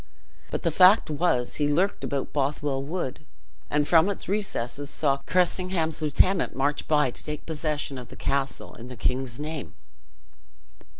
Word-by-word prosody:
But - - -3
the 165 - +2
fact 185 +2 +6
was, 145 -6 +1
he 145 - +2
lurked 180 +7 +1
about 140 -1 -1
in - - -32
Bothwell 140 -1 0
wood; 150 -1 -4 0.5
and 150 0 +1
from 165 +3 +5
its 200 - -4
recesses 145 - -2
saw 140 -3 +1
Cressingham's 180 -3 +1
lieutenant 160 +5 +2
march 140 +2 0
by 150 -4 +3
to - - -8
take 150 -1 -5
possession 150 -3 -3
of 125 - -9
the - - -12
castle 140 0 -2
in 120 - -10
the 125 -1 -9
king's 125 +2 -1
name. 150 -3 -5
150 Hz, 160 wpm, -26 LUFS, 135-170 Hz, 0.5 s, fact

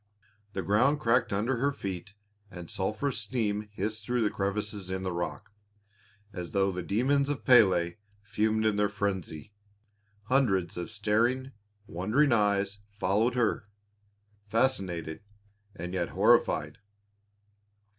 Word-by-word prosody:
The 95 - -3
ground 130 +9 +3
cracked 125 -2 +2
under 110 +6 0
her 140 +4 +1
feet 100 -6 -6 0.3
and 90 -3 -9
sulphurous 110 +8 -2
steam 105 -4 -2
hissed 105 +2 -3
through 120 0 +1
crevices 100 -1 -3
in 95 0 -3
the 95 - -2
rock, 85 +3 -4 0.8
as 90 -2 -6
though 100 -1 +2
the 90 0 -4
demons 135 +9 +1
of 145 - -3
Pélé 95 -9 +5 0.3
fumed 110 +1 0
in 105 -1 +2
their 105 0 +2
frenzy. 100 -3 -3 0.7
Hundreds 105 -7 +1
of 90 -1 -5
staring, 115 +5 0 0.3
wondering 105 - +1
eyes 100 -2 +1
followed 105 +4 0
her, 115 -3 0 0.8
fascinated 95 - 0 0.5
and 90 +2 -6
yet 90 -2 -1
horrified. - - +2
105 Hz, 120 wpm, -29 LUFS, 95-115 Hz, 0.8 s, Pélé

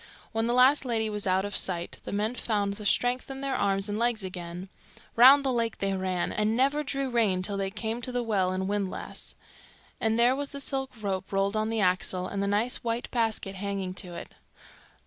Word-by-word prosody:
When 225 0 0
the 240 - +1
last 260 +4 +5
lady 225 -4 -1
was 210 -1 -2
out 190 +1 +2
of 205 -1 -4
sight, 175 -2 +1
the - - -5
men 210 +3 0
found 205 -5 -1
the 205 0 -4
strength 245 +5 +1
in 270 0 -6
their 275 -1 -1
arms 195 0 0
and 205 +1 -3
legs 235 -3 +1
again. 180 0 -6 0.5
Round 270 +4 +8
the 265 - +1
lake 230 -2 -1
they 195 0 -1
ran, 185 -2 -1
and 215 +2 0
never 280 +3 +2
drew 275 -1 -2
rein 205 -6 +2
till 200 +1 -1
they 195 -1 -1
came 220 +4 -4
to 250 - +2
the 245 -1 -1
well 200 -5 +1
and 190 0 -2
windlass; 200 -2 -4 0.6
and 225 -2 +1
there 240 +2 +4
was 285 0 -3
the 280 - -7
silk 270 -1 0
rope 190 -2 -3
rolled 195 +1 0
on 215 0 0
the 225 -1 0
axle, 185 -1 +1
and 200 0 -3
the 200 - 0
nice 210 +5 +1
white 235 0 -3
basket 225 -4 -1
hanging 195 -1 -3
to 180 -2 -6
it. - - -8
215 Hz, 215 wpm, -28 LUFS, 195-240 Hz, 0.6 s, Round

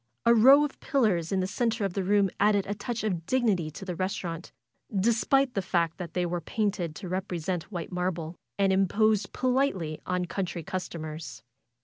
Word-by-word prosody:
A 235 - +7
row 265 +6 +7
of 295 - -7
pillars 210 - +1
in 190 -1 +1
the - - 0
center 225 +2 0
of 195 - -2
the 195 - -1
room 200 0 +3
added 205 -1 +3
a 205 - -2
touch 220 +3 -4
of 175 -6 -2
dignity 215 -11 +1
to 155 +5 -9
the 180 - -3
restaurant, 175 -2 -3 0.5
despite 245 +5 +2
the 195 - 0
fact 170 -2 0
that 170 -3 -7
they 180 -1 +1
were 175 0 -2
painted 190 -6 -2
to 185 - -7
represent 180 -1 -3
white 175 -2 -5
marble, 180 -2 -2 0.2
and 195 -1 +3
imposed 200 +2 +2
politely 250 - 0
on 180 0 0
country 175 -2 -3
customers. 165 -4 -6
190 Hz, 175 wpm, -28 LUFS, 175-215 Hz, 0.5 s, A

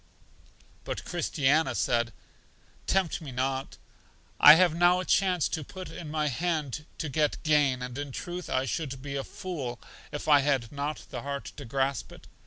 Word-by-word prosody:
But - - -5
Christiana 160 -3 +1
said: 120 -1 +1 0.8
Tempt 190 -3 +1
me 145 -4 -7
not. 130 +2 -2 0.6
I 150 - +11
have 175 -1 +4
now 175 +2 +4
a 185 - -3
chance 185 -4 +2
put 175 +4 -6
in 160 - -7
my 150 0 0
hand 150 0 -2
to 160 - -3
get 150 +1 +1
gain, 145 -5 +3
and 125 -1 -6
in 145 0 -5
truth 175 +6 -6
I 130 +1 +1
should 135 +1 -3
be 140 -1 -5
a 135 - -2
fool 145 - -5 0.3
if 145 - -5
I 145 -2 +7
had 135 -5 0
not 145 +1 -4
the - - -4
heart 140 0 -5
to 145 - -7
grasp 135 +3 -1
it. - - -14
145 Hz, 170 wpm, -28 LUFS, 135-165 Hz, 0.8 s, I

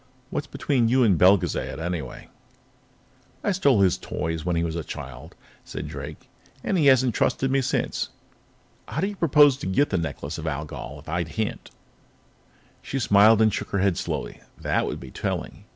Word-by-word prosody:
"What's - - -3
between 125 -5 +1
you 130 +1 +4
and 105 -5 +4
Belgezad, 90 -4 +3
anyway?" 80 -6 -5 1.1
"I 205 - +1
stole 140 - +3
his 95 -2 +3
toys 80 0 -3
when 90 -1 0
he 85 - +1
was 85 -1 -2
a 85 - -3
child," - - -9 0.3
said - - -6
Drake, - - -8 0.4
"and 195 - 0
he 155 -6 +3
hasn't 130 -3 +5
trusted 135 +4 +1
me 135 0 +3
since. 125 - -1 0.8
How 155 - -3
do - - +2
you 205 +1 -4
propose 145 -5 +5
to 135 - -5
get 140 +10 +2
the 95 - +1
Necklace 80 -1 -4
of 80 - -5
Algol 75 -2 -5
if - - -21
I 85 +3 -1
can't?" 105 +7 -4 1.1
She 135 - -4
smiled 110 -1 +5
and 110 -2 +3
shook - - -3
her 100 - -1
head 95 -2 +2
slowly. - - -4 0.2
"That - - 0
would - - -4
be 65 - -10
telling. - - -4
100 Hz, 180 wpm, -25 LUFS, 85-130 Hz, 1.1 s, hasn't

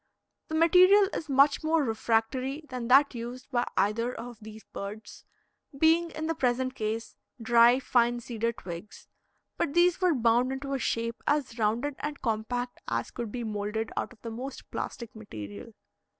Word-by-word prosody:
The 315 - -4
material 370 +5 +6
is 310 - -4
much 275 +3 +4
more 315 0 +2
refractory 255 +5 -1
than 250 -2 -4
that 275 +3 +6
used 245 +3 -7
by 245 -2 +1
either 230 +4 +1
of 240 -2 -8
these 220 0 -11
birds, 210 +2 -8 0.5
being, 325 +3 +4
in 315 -1 -5
the 325 - 0
present 255 -3 0
case, 220 -1 -4 0.2
dry, 235 +2 +5
fine 240 -2 +2
cedar 230 -1 -2
twigs; 190 -5 -9 0.5
but 280 - -1
these 350 +1 +4
were 360 -4 +3
bound 240 +1 +3
into 275 +1 -4
a 270 - -1
shape 230 -1 -2
as 280 -5 0
rounded 235 +7 0
and 295 -1 -4
compact 245 +2 -2
as 115 0 -2
could 235 -3 -5
be 240 0 -4
moulded 215 +1 -3
out - - -2
of 245 - -17
the 230 - -5
most 255 +4 -7
plastic 235 -2 -5
material. 105 - -9
245 Hz, 165 wpm, -28 LUFS, 225-275 Hz, 0.5 s, material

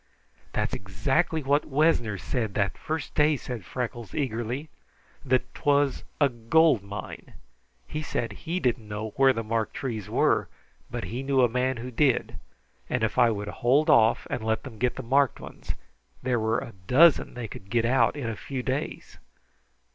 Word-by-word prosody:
"That's - - -1
exactly 145 - 0
what 140 +2 +2
Wessner 135 -8 +2
said 110 0 -3
that 100 -1 +1
first 155 -3 -4
day," 150 0 +3
said 125 -5 -6
Freckles 120 +2 -5
eagerly. 125 +1 -2 0.5
"That 130 -2 0
'twas 145 -2 +1
a 145 - +5
'gold 130 +2 +3
mine'! 100 -1 -8 0.5
He 155 - -4
said 120 -6 -2
he 165 - -4
didn't 120 -7 0
know 105 +1 -4
where 135 +3 +5
the 115 -3 -2
marked 110 -1 -2
trees 115 -7 -4
were, - - +2 0.4
but - - -4
he 120 +4 -4
knew 135 -1 +2
a - - +6
man 125 +2 0
who 125 +2 -6
did, 130 +1 +1 0.5
and 125 -3 0
if 110 +3 0
I 120 -1 +6
would 105 -2 -3
hold 135 +8 +3
off 110 0 +4
and 115 - -3
let 110 0 0
them 115 -5 -10
get 125 +1 +1
the 130 - -6
marked 135 +2 +2
ones, - - -7 0.5
there 125 -2 +1
were 110 +1 +1
a 115 - -6
dozen 155 +4 +5
they 120 -2 -4
could 95 -1 -11
get 115 +1 +1
out 130 +5 +3
in 140 -5 -4
a 115 - -2
few 130 +1 -5
days." 135 +4 -4
125 Hz, 175 wpm, -27 LUFS, 110-140 Hz, 0.5 s, a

